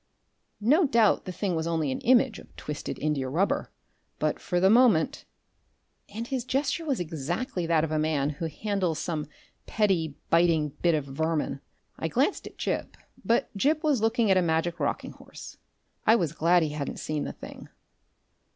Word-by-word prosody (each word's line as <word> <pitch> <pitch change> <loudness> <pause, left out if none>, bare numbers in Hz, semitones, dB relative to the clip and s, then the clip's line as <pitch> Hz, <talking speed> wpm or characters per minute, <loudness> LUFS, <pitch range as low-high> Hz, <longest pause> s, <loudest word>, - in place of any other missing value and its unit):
No 290 - +4
doubt 230 -5 +3
the 185 - -4
thing 185 0 -2
was 160 0 -2
only 160 -4 0
an - - -3
image 250 -1 +3
of - - -17
twisted 150 -1 -5
indiarubber, 150 +4 0 0.5
but - - -1
for 180 - -1
the 190 - +4
moment! 235 - +4 0.8
And 225 +3 -5
his 255 0 -2
gesture 280 +6 -1
was 280 -5 0
exactly 170 - -3
that 165 -2 +3
of 160 - -2
a 155 - +1
man 150 -2 +1
who 155 +3 -4
handles 185 0 -2
some 155 -2 -3 0.4
petty 175 -9 +1 0.2
biting 165 -3 +3
bit 170 -2 +3
of 150 -3 -2
vermin. 150 0 -2 0.4
I 160 - -1
glanced 270 - 0
at - - -13
Gip, - - -3 0.3
but 235 -1 0
Gip 300 - +1
was 290 -7 +2
looking 225 -1 +2
at 190 - +5
a - - +4
magic 170 +1 0
rocking - - -2
horse. - - -12 0.5
I 220 - +7
was 170 -8 0
glad 170 +1 +3
he 155 - -1
hadn't 150 -1 -4
seen 155 -1 -3
the - - -4
thing. - - -11
175 Hz, 170 wpm, -27 LUFS, 155-230 Hz, 0.8 s, I